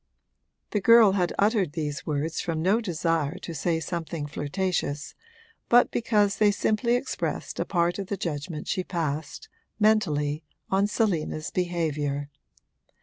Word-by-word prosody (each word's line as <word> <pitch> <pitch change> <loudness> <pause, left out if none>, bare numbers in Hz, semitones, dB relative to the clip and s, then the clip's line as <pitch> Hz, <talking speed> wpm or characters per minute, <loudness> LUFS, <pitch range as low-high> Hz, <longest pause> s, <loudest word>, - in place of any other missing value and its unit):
The 210 - 0
girl 230 0 +7
had 180 -3 +1
uttered 200 -6 +2
these 150 -3 -4
words 155 +2 -1
from 165 -2 -2
no 205 +6 +3
desire 165 -4 -1
to 175 -3 -7
say 165 +2 0
something 165 -2 -4
flirtatious, 145 0 -2 0.6
but 245 +1 +5
because 210 -3 +2
they 210 -1 +5
simply 220 +4 +1
expressed 260 +2 -3
a - - 0
part 175 0 +1
of 195 - -4
the 200 - -3
judgment 150 -1 -4
she 185 - -1
passed, 155 -5 -3 0.3
mentally, 155 -9 +2 0.3
on 195 +1 +3
Selina's 170 -8 -1
behaviour. 150 -5 -1
175 Hz, 135 wpm, -26 LUFS, 155-205 Hz, 0.6 s, girl